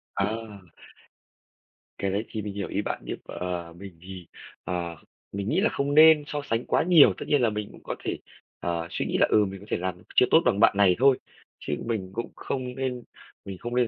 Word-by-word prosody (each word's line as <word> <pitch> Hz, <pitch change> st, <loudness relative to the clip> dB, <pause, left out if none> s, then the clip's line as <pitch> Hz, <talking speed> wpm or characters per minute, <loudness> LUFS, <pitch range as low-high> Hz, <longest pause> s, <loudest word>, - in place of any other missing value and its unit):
À! 105 Hz, -2 st, -3 dB, 1.3 s
Cái 100 Hz, -, -1 dB
đấy 100 Hz, +3 st, -1 dB
thì 110 Hz, -, -4 dB
mình 100 Hz, -1 st, -5 dB
hiểu 100 Hz, -1 st, -4 dB
ý 100 Hz, -, -2 dB
bạn, -, -, -4 dB
nhưng -, -, -4 dB
mà 90 Hz, -2 st, -5 dB
mình 90 Hz, -2 st, -12 dB
thì, 90 Hz, -2 st, -10 dB, 0.4 s
ờ, 85 Hz, -2 st, -3 dB, 0.4 s
mình 100 Hz, +1 st, -3 dB
nghĩ 170 Hz, -, +2 dB
là 220 Hz, -, +3 dB
không 140 Hz, +1 st, -1 dB
nên 155 Hz, -1 st, +8 dB
so 150 Hz, -1 st, -3 dB
sánh 115 Hz, +1 st, 0 dB
quá -, -, +2 dB
nhiều. 170 Hz, -4 st, +7 dB
Tất -, -, -6 dB
nhiên 145 Hz, -3 st, +3 dB
là 120 Hz, -, +3 dB
mình 105 Hz, -1 st, -4 dB
cũng -, -, -16 dB
có -, -, -4 dB
thể, -, -, -2 dB, 0.4 s
ờ, 85 Hz, -1 st, -2 dB
suy -, -, -2 dB
nghĩ -, -, -1 dB
là, -, -, +5 dB
ừ, 105 Hz, -1 st, +4 dB
mình 95 Hz, 0 st, -7 dB
có 100 Hz, -, -13 dB
thể -, -, 0 dB
làm 90 Hz, 0 st, -4 dB
chưa -, -, +6 dB
tốt 160 Hz, -, +7 dB
bằng 100 Hz, -, +2 dB
bạn 100 Hz, -, +5 dB
này 95 Hz, -3 st, +5 dB
thôi, 135 Hz, -1 st, +5 dB, 0.4 s
chứ 75 Hz, -, -4 dB
mình 110 Hz, -5 st, -3 dB
cũng 115 Hz, +3 st, -4 dB
không 125 Hz, -2 st, -4 dB
nên 130 Hz, -2 st, -3 dB, 0.4 s
mình 95 Hz, -1 st, -7 dB
không 120 Hz, +5 st, -5 dB
nên 125 Hz, -2 st, +3 dB
105 Hz, 225 wpm, -26 LUFS, 95-125 Hz, 1.3 s, nên